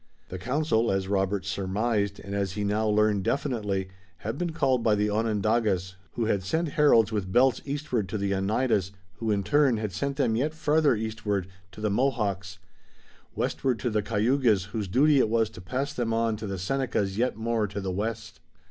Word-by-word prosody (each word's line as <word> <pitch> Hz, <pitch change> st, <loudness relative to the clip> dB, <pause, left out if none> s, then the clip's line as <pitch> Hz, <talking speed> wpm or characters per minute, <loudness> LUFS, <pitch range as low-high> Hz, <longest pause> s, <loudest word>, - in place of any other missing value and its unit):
The 95 Hz, -, -6 dB
council, 125 Hz, -, +1 dB
as 95 Hz, -1 st, -1 dB
Robert 95 Hz, -1 st, 0 dB
surmised 100 Hz, +1 st, -1 dB
and 100 Hz, -, -7 dB
as 100 Hz, -2 st, -1 dB
he 105 Hz, +1 st, -3 dB
now 105 Hz, +2 st, 0 dB
learned 105 Hz, -2 st, +2 dB
definitely, 105 Hz, -8 st, -1 dB, 0.3 s
had 110 Hz, +4 st, -4 dB
been 175 Hz, -1 st, -2 dB
called 135 Hz, -6 st, +1 dB
by 110 Hz, -2 st, +3 dB
the 105 Hz, 0 st, 0 dB
Onondagas, 105 Hz, -3 st, 0 dB, 0.2 s
who 115 Hz, -, -1 dB
had 100 Hz, -3 st, +1 dB
sent 160 Hz, -, -1 dB
heralds 140 Hz, -8 st, +4 dB
with 100 Hz, -4 st, -2 dB
belts 125 Hz, +3 st, +4 dB
eastward 135 Hz, -, -2 dB
to 110 Hz, -, -2 dB
the 100 Hz, -1 st, -1 dB
Oneidas, 100 Hz, 0 st, 0 dB, 0.2 s
who 115 Hz, -, -3 dB
in 100 Hz, -2 st, +1 dB
turn 145 Hz, -3 st, +3 dB
had 105 Hz, -2 st, -3 dB
sent 140 Hz, +9 st, -2 dB
them 125 Hz, -6 st, +2 dB
yet 150 Hz, +7 st, -1 dB
farther 155 Hz, -3 st, +3 dB
eastward 105 Hz, -3 st, -2 dB, 0.3 s
to -, -, -10 dB
the 105 Hz, -1 st, 0 dB
Mohawks, 100 Hz, -6 st, -1 dB, 0.8 s
westward 130 Hz, -3 st, 0 dB
to 115 Hz, +3 st, -2 dB
the 105 Hz, 0 st, +1 dB
Cayugas 110 Hz, -2 st, +1 dB
whose 105 Hz, -3 st, -3 dB
duty 140 Hz, +9 st, +4 dB
it 110 Hz, -, +3 dB
was 115 Hz, -1 st, +1 dB
to -, -, -11 dB
pass 130 Hz, +10 st, -3 dB
them 115 Hz, -4 st, -1 dB
on 115 Hz, -1 st, +1 dB
to 105 Hz, 0 st, -6 dB
the 100 Hz, -1 st, -3 dB
Senecas 100 Hz, -2 st, -1 dB
yet 125 Hz, -2 st, 0 dB
more 110 Hz, -1 st, 0 dB
to 100 Hz, +1 st, -5 dB
the 95 Hz, -1 st, -3 dB
west. 105 Hz, +3 st, -4 dB
110 Hz, 190 wpm, -27 LUFS, 100-125 Hz, 0.8 s, heralds